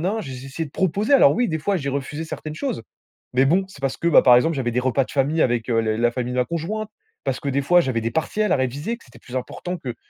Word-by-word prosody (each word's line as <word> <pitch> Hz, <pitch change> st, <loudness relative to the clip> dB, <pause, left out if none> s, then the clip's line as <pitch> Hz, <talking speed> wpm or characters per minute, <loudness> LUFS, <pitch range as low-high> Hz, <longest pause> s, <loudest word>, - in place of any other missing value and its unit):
na.», 225 Hz, -, -2 dB
j'ai 135 Hz, -3 st, -7 dB
j'ai 130 Hz, +1 st, -8 dB
essayé 160 Hz, +4 st, -4 dB
de 145 Hz, -, -12 dB
proposer. 195 Hz, -, 0 dB
Alors 275 Hz, -, +7 dB
oui, 245 Hz, 0 st, +1 dB
des 160 Hz, -2 st, -2 dB
fois, 195 Hz, +5 st, 0 dB
j'ai 140 Hz, -4 st, -4 dB
refusé 140 Hz, +3 st, -4 dB
certaines 155 Hz, -1 st, -6 dB
choses. 260 Hz, -, -3 dB, 0.5 s
Mais 130 Hz, +2 st, +4 dB
bon, 180 Hz, +7 st, +3 dB
c'est 165 Hz, -, -14 dB
parce 135 Hz, -1 st, -1 dB
que, 170 Hz, -, -1 dB
bah -, -, +7 dB
par 125 Hz, -2 st, +8 dB
exemple, 160 Hz, +6 st, +3 dB
j'avais 120 Hz, -2 st, -1 dB
des 125 Hz, -, +1 dB
repas 130 Hz, +1 st, +1 dB
de -, -, -12 dB
famille 145 Hz, +4 st, +1 dB
avec, 120 Hz, -1 st, +1 dB
heu, 115 Hz, -, +2 dB
le 110 Hz, -1 st, 0 dB
la 120 Hz, 0 st, +2 dB
famille 125 Hz, 0 st, -3 dB
de -, -, -3 dB
ma 125 Hz, -, +4 dB
conjointe. 200 Hz, +6 st, -3 dB, 0.4 s
Parce 135 Hz, -2 st, -1 dB
que 140 Hz, -, -6 dB
des 140 Hz, +1 st, 0 dB
fois, 175 Hz, +6 st, +4 dB
j'avais 130 Hz, -6 st, -1 dB
des 115 Hz, +1 st, -2 dB
partiels 210 Hz, +6 st, 0 dB
à -, -, +4 dB
réviser, 140 Hz, -, -2 dB
que -, -, -21 dB
c'était 125 Hz, -, -17 dB
plus 125 Hz, -, -10 dB
important 180 Hz, +8 st, -5 dB
que 125 Hz, -7 st, -6 dB
140 Hz, 290 wpm, -22 LUFS, 125-170 Hz, 0.5 s, par